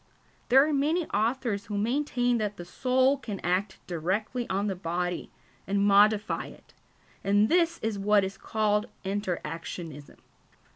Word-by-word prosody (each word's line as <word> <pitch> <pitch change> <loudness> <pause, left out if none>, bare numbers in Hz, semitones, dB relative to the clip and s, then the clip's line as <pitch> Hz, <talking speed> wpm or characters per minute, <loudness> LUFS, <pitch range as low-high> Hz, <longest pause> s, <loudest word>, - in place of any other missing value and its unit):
There 270 +4 +6
are 310 - 0
many 310 +5 +1
authors 225 -1 -1
who 205 -1 -3
maintain 245 +1 +1
that 210 -1 -2
the 175 - -7
soul 260 +8 +2
can 210 -7 -6
act 185 +3 -1
directly 195 +8 -2
on 195 +2 0
the 195 -2 -1
body 175 0 -3 0.4
and 200 +1 +1
modify 205 +1 +3
it, - - -16 0.5
and 205 +2 +3
this 335 -1 +3
is 220 -2 -1
what 205 0 +4
is 190 +1 -4
called 210 +1 0 0.2
inter 195 -2 -2
actionism. 160 -2 -7
210 Hz, 145 wpm, -28 LUFS, 190-245 Hz, 0.5 s, There